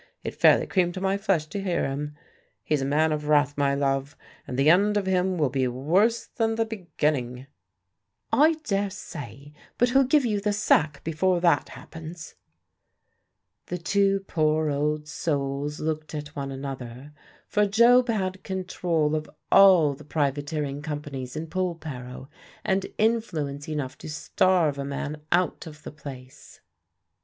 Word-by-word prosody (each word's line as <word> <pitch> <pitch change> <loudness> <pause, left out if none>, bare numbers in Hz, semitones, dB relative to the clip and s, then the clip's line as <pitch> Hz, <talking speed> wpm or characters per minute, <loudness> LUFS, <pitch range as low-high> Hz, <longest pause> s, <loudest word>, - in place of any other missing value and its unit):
It - - -4
fairly - - +5
creamed 180 -1 0
my 190 +1 +1
flesh 195 -6 0
to 200 - -4
hear 185 -3 0
him. 145 +2 -4 0.5
He's 150 -2 0
a - - -1
man 155 +3 +2
of 150 -1 -2
wrath, 145 -1 +3
my 140 -1 +1
love, 140 +1 -1 0.3
and 125 - -4
the 135 +2 +3
end 200 +6 +5
of 200 - 0
him 185 0 +1
will 145 -5 +1
be 130 -2 +1
worse 175 - +1
than 225 -2 -1
the 225 0 +1
beginning." 150 - -2 0.9
"I 300 +8 +5
daresay; 190 - -4 0.3
but 245 - +3
he'll 270 +2 +5
give 275 +1 +3
you 210 -3 0
the 205 0 0
sack 155 -8 +2
before 175 +3 +1
that 170 -5 +3
happens." 160 0 -10 1.3
The 180 - -3
two 195 +2 +1
poor 155 -4 +1
old 150 +1 -1
souls 145 -1 -2
looked 155 0 -3
at 150 0 -7
one 140 -1 -4
another; 135 0 -7 0.3
for 210 0 +2
Job 240 +4 +5
had 190 -4 -1
control 180 -5 -1
of 155 -1 -4 0.2
all 185 -7 +7
the 145 +2 -12
privateering 145 -1 -2
companies 145 -4 -5
in 155 +1 -3
Polperro, 155 -8 -5 0.4
and 190 0 0
influence 165 -11 -1
enough 145 -4 -4
to - - -8
starve 155 0 +1
a - - -2
man 145 +2 -4
out 175 0 +1
of 150 -1 -12
the - - -7
place. 130 -4 -11
155 Hz, 150 wpm, -26 LUFS, 145-190 Hz, 1.3 s, all